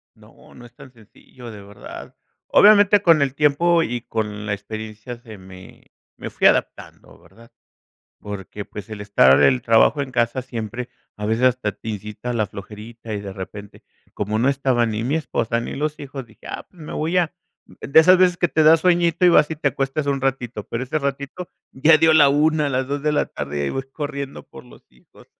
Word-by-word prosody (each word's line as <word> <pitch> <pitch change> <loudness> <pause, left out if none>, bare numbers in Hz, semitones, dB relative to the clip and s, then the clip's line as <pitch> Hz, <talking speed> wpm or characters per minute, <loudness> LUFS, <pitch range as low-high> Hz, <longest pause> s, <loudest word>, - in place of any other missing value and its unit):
No, - - -20
no 120 - -14
es 120 - -17
tan 130 - -14
sencillo, 120 +1 -15
de 105 -2 -11
verdad. 100 +1 -11 0.3
Obviamente, 205 -1 +6
con 165 -6 +4
el 135 -1 0
tiempo 165 +3 +3
y 120 -3 -4
con 105 -2 -4
la 105 - -1
experiencia, 110 +3 -8
se 110 -3 -12
me 95 0 -15 0.3
me - - -7
fui - - +3
adaptando, - - -2
¿verdad?, 115 +1 -20 0.7
porque, 105 0 -8
pues, 105 +1 -10
el 110 -2 -8
estar 70 -10 +4
el 125 - +4
trabajo 115 +5 +3
en 135 -2 -4
casa 120 +1 0
siempre 120 0 -6 0.3
a 105 - -5
veces, 110 +3 0
hasta 125 -5 +1
te - - -11
incita 105 +3 -6
la 110 -3 0
flojerita 110 +3 -10
y, 100 - -3
de 100 -1 -7
repente, 100 +1 -10 0.3
como 105 +1 -2
no 125 +4 +2
estaba 130 -4 +1
ni 110 0 -3
mi 135 +5 -1
esposa 115 -7 -2
ni - - -6
los 150 +2 -3
hijos, 135 -2 -7
dije: 110 - -18
"Ah, - - -7
pues, 180 - -20
me - - -8
voy 165 +4 0
a", 175 0 -1 0.3
de 140 - +3
esas 180 +3 +6
veces 180 -1 +3
que 175 - +1
te 155 - +1
da 155 +1 +7
sueñito 175 0 +2
y - - +7
vas, 155 -3 +4
y 160 - -4
te 145 -1 0
acuestas 135 +2 -3
un 140 -1 -1
ratito, 125 -5 -2
pero 115 +2 -4
ese 155 +4 -2
ratito 140 +5 -5 0.2
ya 155 +4 +4
dio 160 0 +4
la 145 -3 +6
1 150 +1 +2
las 130 0 -1
2 140 0 -3
de 150 0 +1
la 145 - +1
tarde 75 0 -6
y - - -2
ahí 70 - -2
voy 135 0 -4
corriendo 140 -2 -6
por - - -13
los - - -17
hijos. 60 -1 -22
125 Hz, 210 wpm, -21 LUFS, 110-150 Hz, 0.7 s, da